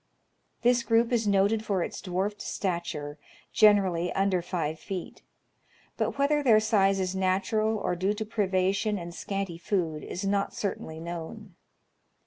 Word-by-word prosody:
This 245 0 +4
group 230 0 +2
is 230 -3 +1
noted 200 +2 +3
for 195 -5 0
its - - -6
dwarfed 195 +2 -2
stature, 165 -6 -3 0.3
generally 190 -5 +4
under 195 -2 +1
five 160 -3 -3
feet; 185 +1 -6 0.7
but - - -2
whether 290 +2 +2
their 230 -6 +5
size 195 -3 +2
is 185 0 -1
natural, 195 +4 +1
or 180 - -1
due 190 +4 0
to 220 +1 -4
privation 200 0 0
and 170 -1 -7
scanty 195 -3 -4
food, 170 -6 -1
is 190 +3 -5
not 200 0 0
certainly 160 -5 -4
known. 170 +4 -7
195 Hz, 140 wpm, -28 LUFS, 175-215 Hz, 0.7 s, their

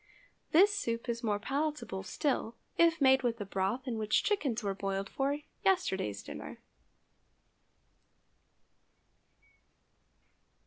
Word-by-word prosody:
This 395 +6 +6
soup 230 -11 -2
is 235 -1 -2
more 210 -4 +1
palatable 275 -4 -2
still 225 +4 -1 0.2
if 335 -1 +4
made 265 -1 +5
with 235 -2 0
the 205 - -5
broth 195 +7 -1
in 230 -3 -2
which 215 0 +2
chickens 275 - 0
were 200 -1 0
boiled 195 0 -2
for 280 +4 -1 0.3
yesterday's 190 - +1
dinner. - - -8
235 Hz, 105 wpm, -32 LUFS, 200-290 Hz, 0.3 s, This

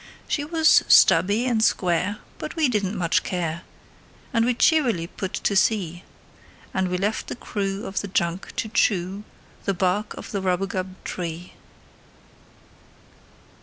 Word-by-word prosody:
She 290 - -1
was 320 +1 +4
stubby 205 +6 +5
and 230 -3 +1
square, 185 0 +1 0.2
but - - -6
we 320 -3 +3
didn't 210 -4 -1
much 170 -2 +2
care, 170 -2 -3 0.7
And 230 -2 +3
we 245 0 +1
cheerily 245 - +3
put 185 +2 -6
to 200 - -1
sea; 185 -4 +1 0.7
And 190 0 0
we 180 0 -1
left 205 +4 -2
the - - -5
crew 200 -3 -3
of 190 - -2
the 200 - -5
junk 175 -1 -2
to - - -2
chew 195 -2 0 0.4
The 195 - 0
bark 185 +3 0
of - - -9
the 200 - -2
rubagub 185 0 -2
tree. 170 0 -5
195 Hz, 140 wpm, -24 LUFS, 180-220 Hz, 0.7 s, stubby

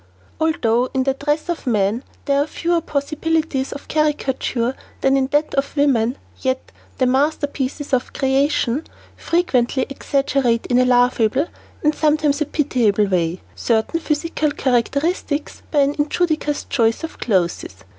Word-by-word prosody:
Although 250 -6 +1
in 260 - +2
the 270 0 +1
dress 295 +3 -1
of 345 -5 -4
man 215 +1 +1 0.2
there 280 0 +2
are 290 - -1
fewer 340 +2 0
possibilities 305 -1 -1
of 280 - -8
caricature 265 -5 0 0.3
than 270 0 +3
in 265 -1 +2
that 295 +2 0
of 280 +2 -1
woman, 260 -3 +2 0.2
yet, 260 -1 -2 0.3
"the 260 - +2
masterpieces 285 +1 -1
of 255 -1 +1
creation" 270 0 +1 0.3
frequently 265 -7 +1
exaggerate 275 -4 0
in 245 0 +2
a 255 - +4
laughable 245 +1 +3 0.4
and 300 0 +3
sometimes 300 -1 +1
a - - +3
pitiable 235 -9 +2
way, 180 -2 0
certain 230 +8 0
physical 310 0 -1
characteristics 285 +3 -1
by 295 - +3
an 280 +1 +2
injudicious 305 -1 0
choice 230 +1 +1
of 325 - -6
clothes. 185 -6 +1
275 Hz, 135 wpm, -20 LUFS, 245-300 Hz, 0.4 s, a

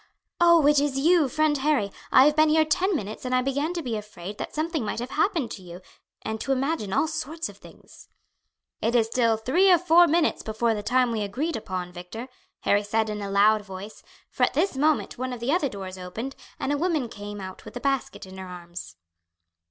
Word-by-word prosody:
"Oh, 340 -3 +6
it 295 0 +5
is 285 -2 0
you, 315 0 +4
friend 310 +3 +2
Harry! 265 -8 +1 0.2
I 260 - +7
have 300 0 +4
been 310 0 +5
here 315 0 +4
ten 365 +5 +1
minutes, 215 -4 -5
and 255 0 0
I 255 - +2
began 280 +4 -1
to 340 - -3
be 240 -4 -2
afraid 210 -2 -8
that - - -4
something 315 -2 -1
might 210 - -3
have 245 +3 -5
happened 320 - 0
to 195 - -7
you 175 -1 -10 0.4
and 220 0 -4
to 275 - -2
imagine 270 -5 -1
all 315 - +2
sorts 320 0 -4
of - - -13
things." - - -16 0.7
"It 230 +2 +1
is 230 -2 +4
still 230 -1 +1
three 340 - +3
or 355 - +7
four 345 0 +5
minutes 330 +1 +2
before 225 +1 0
the 210 - -3
time 250 +3 +2
we 220 -2 -1
agreed 265 +11 -2
upon, 185 -4 -5
Victor," 185 +8 -8 0.3
Harry 205 0 +3
said 220 +1 0
in 210 0 -4
a 200 - -4
loud 210 +2 +4
voice, 195 +1 -9 0.3
for - - -8
at - - +3
this 390 - +1
moment 300 -2 +1
one 255 0 -3
of 245 - -6
the 240 +4 -1
other 310 -4 +1
doors 190 -3 -7
opened, 225 +9 -6 0.2
and 285 - -1
a 290 - -1
woman 320 -7 0
came 205 -1 -8
out 190 -1 -8
with - - -8
a - - -4
basket 270 -5 -2
in 190 0 -11
her 190 - -7
arms. 175 - -9
250 Hz, 220 wpm, -25 LUFS, 205-305 Hz, 0.7 s, I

